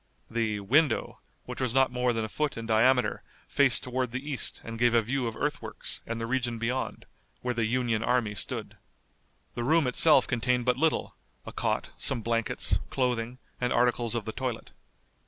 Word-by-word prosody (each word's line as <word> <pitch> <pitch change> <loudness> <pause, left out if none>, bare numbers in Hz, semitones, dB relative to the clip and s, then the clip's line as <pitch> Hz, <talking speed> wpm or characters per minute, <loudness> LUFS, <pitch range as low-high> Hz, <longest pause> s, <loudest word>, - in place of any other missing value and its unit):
The 110 -3 -1
"window," 145 +10 +2 0.3
which - - -6
was 130 -1 -1
not 135 -1 +4
more 125 0 +1
than 115 -2 -1
a - - -4
foot 150 +4 -2
in 115 - -5
diameter 125 +3 +3 0.3
faced 140 -3 +3
toward 125 0 -1
the 135 +5 -4
east 135 - -1
and 115 0 -7
gave 120 0 +4
a 115 - +6
view 125 +2 -1
of 115 - -4
earthworks, - - -2
and 115 0 -3
the 115 - -2
region 120 -1 -1
beyond, 120 +3 -2 0.4
where 125 0 0
the 115 -2 0
Union 120 -2 0
army 120 -4 +1
stood. - - -5 0.8
The 120 - -3
room 155 +4 +3
itself 150 +5 +5
contained 125 0 0
but 125 - +3
little, 160 +3 0 0.3
a - - -7
cot, - - -1
some 115 - 0
blankets, 115 0 0
clothing, 125 -2 -1 0.2
and 125 0 +1
articles 120 -1 +2
of 115 -3 -2
the 110 - -3
toilet. 125 -1 -4
120 Hz, 180 wpm, -28 LUFS, 115-130 Hz, 0.8 s, a